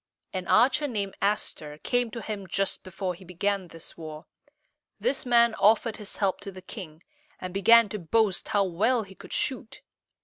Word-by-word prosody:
An 185 -2 -4
archer 260 +8 +4
named 205 -6 -3
As´ter 155 -7 -2
came 245 -1 +1
to 230 +1 -7
him 205 -3 -5
just 195 +2 -1
before 185 0 -4
he 180 +2 -13
began 185 +1 -1
this 165 -1 -10
war. 155 -2 -8 0.7
This 250 +5 -1
man 235 -1 +5
offered 220 +2 +3
his 210 -2 -5
help 195 -2 0
to 200 - -7
the 185 -1 -11
king, 175 -6 -9 0.4
and 185 -1 -6
began 230 +3 +6
to 210 - -4
boast 195 +3 +1
how 205 - +2
well 220 +7 +1
he 195 -1 -13
could - - -13
shoot. 250 -4 -3
200 Hz, 175 wpm, -27 LUFS, 185-225 Hz, 0.7 s, began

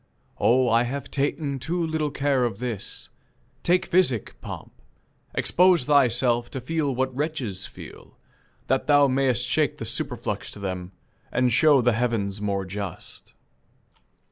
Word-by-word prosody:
Oh, 125 +2 +4
I 115 0 +4
have 135 +4 -4
ta'en 140 0 -1
Too 170 +5 -1
little 160 -2 -1
care 140 -2 +1
of 115 -5 -1
this. 115 -4 -6 0.5
Take 180 +1 +2
physic, 170 - +2
pomp; - - -8 0.6
Expose 180 -4 +4
thyself 120 -4 +3
to 130 - -5
feel 145 +1 -1
what 130 0 -1
wretches 130 - -3
feel, - - -13 0.5
That 130 +1 0
thou 145 -1 +6
may'st 130 -3 +1
shake - - +1
the - - -5
superflux - - -3
to - - -10
them, 95 -2 -4 0.4
And 125 -2 +2
show 145 0 +5
the 120 0 +3
heavens 110 -4 -1
more 100 -2 -1
just." 100 -1 -8
130 Hz, 140 wpm, -25 LUFS, 115-145 Hz, 0.6 s, thou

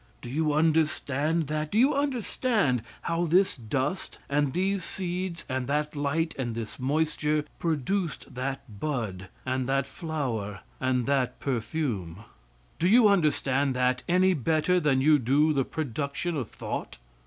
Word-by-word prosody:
Do 120 - -6
you 155 +2 +1
understand 155 0 +1
that? 155 +1 -2
Do 210 - 0
you 265 +6 +5
understand 245 - +1 0.2
how 170 +1 0
this 180 +4 +3
dust 130 - -3
and 145 -1 +1
these 190 +3 0
seeds 180 -1 -4
and 130 -2 -2
that 150 +2 -1
light 155 +3 0
and 120 -3 -2
this 115 -2 -6
moisture 150 +2 0
produced 165 +2 -1
that 130 -4 -5
bud 105 -11 -3 0.2
and 130 0 -1
that 135 0 +2
flower 120 - -3 0.2
and 130 -2 +1
that 135 -3 0
perfume? 115 - -2 0.6
Do 175 - +3
you 225 +3 +7
understand 145 -7 +2
that 125 0 +1
any 185 +1 +4
better 160 +4 +2
than 140 -5 +2
you 150 +1 +5
do 145 +5 +3
the 135 -3 +1
production 150 +3 -3
of 130 -8 -3
thought? - - -5
150 Hz, 145 wpm, -28 LUFS, 130-165 Hz, 0.6 s, you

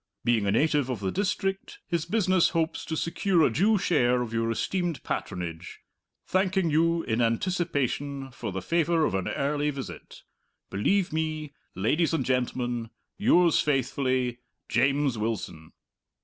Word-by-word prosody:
Being 115 -4 +2
a - - +2
native 145 +3 +2
of 125 -5 -2
the 95 -2 -2
district, 195 -1 -2
his 170 -2 -1
business 185 -3 +3
hopes 160 0 -1
to 160 - -3
secure 170 +1 +1
a - - +3
due 205 - +3
share 125 -9 +2
of 115 -1 -7
your 115 0 0
esteemed 175 +7 -2
patronage. 90 -1 -5 0.4
Thanking 185 -2 +1
you, 165 +2 +2
in 115 +1 0
anticipation, 140 0 -1
for 120 - -5
the 95 0 -4
favour 165 - +2
of - - -1
an 95 -1 -1
early 145 +1 0
visit, 140 -2 -8 0.5
"Believe 175 - +1
me, 155 -2 -2 0.2
Ladies 155 - +1
and 135 -6 -1
Gentlemen, 125 -2 -1 0.3
"Yours 180 -6 +4
faithfully, 130 -3 0 0.3
"JAMES 135 0 +2
WILSON." 100 -8 -4
145 Hz, 140 wpm, -27 LUFS, 120-170 Hz, 0.5 s, Yours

